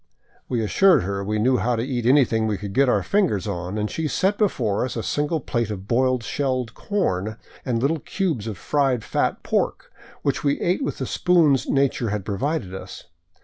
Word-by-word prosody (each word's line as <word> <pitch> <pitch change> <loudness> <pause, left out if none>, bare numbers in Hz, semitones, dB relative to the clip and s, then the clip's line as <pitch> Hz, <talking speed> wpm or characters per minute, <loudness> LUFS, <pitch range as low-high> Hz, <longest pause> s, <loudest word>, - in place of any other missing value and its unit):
We 120 -3 0
assured 185 - +4
her 100 +1 -3
we 105 +2 -1
knew 125 +4 +3
how 125 +1 +1
to 115 - -1
eat 120 -3 -2
anything 120 -5 +4
we 105 -2 -1
could 100 +1 -6
get 135 +3 +3
our 100 -5 +2
fingers 160 - +1
on, 90 0 -4
and 105 0 0
she 160 +7 -2
set 190 +6 +1
be 210 - +5
fore 110 - -1
us 125 - -3
a 115 - -3
single 145 - 0
plate 120 -4 -2
of 100 -2 -6
boiled 125 +1 +2
shelled 130 -3 -2
corn 110 - -2 0.3
and 120 -3 -1
little 150 +6 +1
cubes 155 - -2
of 105 -4 -4
fried 135 -1 0
fat - - -1
pork, - - -1 0.3
which 140 - 0
we 140 -1 +1
ate 180 +10 0
with - - -3
the - - -3
spoons 165 -7 +3
nature 135 -4 +1
had 105 -2 -3
provided 105 - -2
us. 95 0 -8
120 Hz, 200 wpm, -23 LUFS, 105-145 Hz, 0.3 s, be